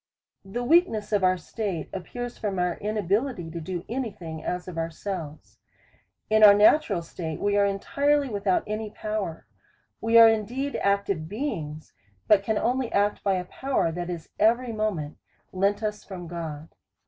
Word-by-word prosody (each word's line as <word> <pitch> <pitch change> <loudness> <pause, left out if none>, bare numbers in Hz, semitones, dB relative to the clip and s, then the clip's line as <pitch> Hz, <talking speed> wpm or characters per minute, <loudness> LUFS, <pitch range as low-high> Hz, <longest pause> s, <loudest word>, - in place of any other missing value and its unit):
The 200 +6 -4
weakness 270 - +3
of 205 -2 +2
our 185 0 +4
state 185 -2 -4
appears 245 +6 -5
from 200 -4 -3
our 180 -1 0
inabi 210 -2 -2
lity 180 -12 -6
to 170 - -5
do 175 +1 -5
any 245 +1 -2
thing, 160 -5 -8
as 180 0 -3
of 180 - -7
ourselves. 165 -1 -5 0.7
In 215 0 +4
our 205 -1 +10
natural 210 - +4
state 160 -2 -6
we 205 0 +1
are 200 0 +4
entirely 280 +9 +1
without 200 -5 0
any 215 0 -3
power; 210 -6 -4 0.6
we 225 +1 +4
are 230 0 +10
in 220 -1 +2
deed 270 +6 -3
active 200 -5 0
beings, 165 - -4 0.3
but 210 -2 +6
can 215 +2 -1
only 250 +2 0
act 205 +1 +1
by 195 -2 +2
a 180 -1 -2
power, 265 -4 -1
that 175 +1 -4
is 170 -3 -6
every 235 +3 +3
moment 205 -9 -2 0.3
lent 200 +3 +1
us 210 -1 -3
from 185 -3 -8
God. 160 -2 -6
200 Hz, 170 wpm, -26 LUFS, 175-220 Hz, 0.7 s, our